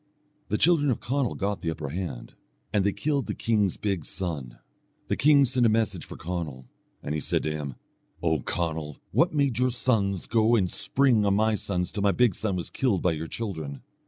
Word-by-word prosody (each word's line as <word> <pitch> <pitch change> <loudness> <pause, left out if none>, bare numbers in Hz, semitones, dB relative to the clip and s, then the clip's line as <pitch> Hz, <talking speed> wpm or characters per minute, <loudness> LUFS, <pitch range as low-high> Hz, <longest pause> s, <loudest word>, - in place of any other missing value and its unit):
The - - +1
children 160 -4 +4
of 125 - +1
Conall 135 -1 -1
got 100 0 -2
the 85 - -1
upper 80 -3 -4
hand, 80 -7 -5 0.4
and 100 - +3
they 100 - +2
killed 140 +5 -1
the - - -3
king's 105 -5 +1
big 100 -6 -1
son. 75 -11 -4 0.5
The - - +2
king 145 -1 +5
sent 130 0 +1
a 115 - +6
message 110 -5 0
for - - -9
Conall, 80 -6 -5 0.4
and 75 - -3
he 75 - -1
said - - 0
to 75 - -1
him: 75 -4 -4 0.5
"O 80 -2 +2
Conall! 80 -1 -3
what 175 - +3
made 140 -5 +1
your 130 0 +3
sons 110 -6 0
go 115 0 +3
to 95 - +1
spring 130 -2 +2
on 100 -1 +3
my 110 +1 +3
sons 90 -4 -2
till 105 - -3
my 100 -1 +3
big 125 -5 +3
son 100 +1 -2
was 90 - -4
killed 115 -9 0
by 90 - +3
your 80 0 -4
children? 80 - -5
100 Hz, 205 wpm, -27 LUFS, 80-120 Hz, 0.5 s, a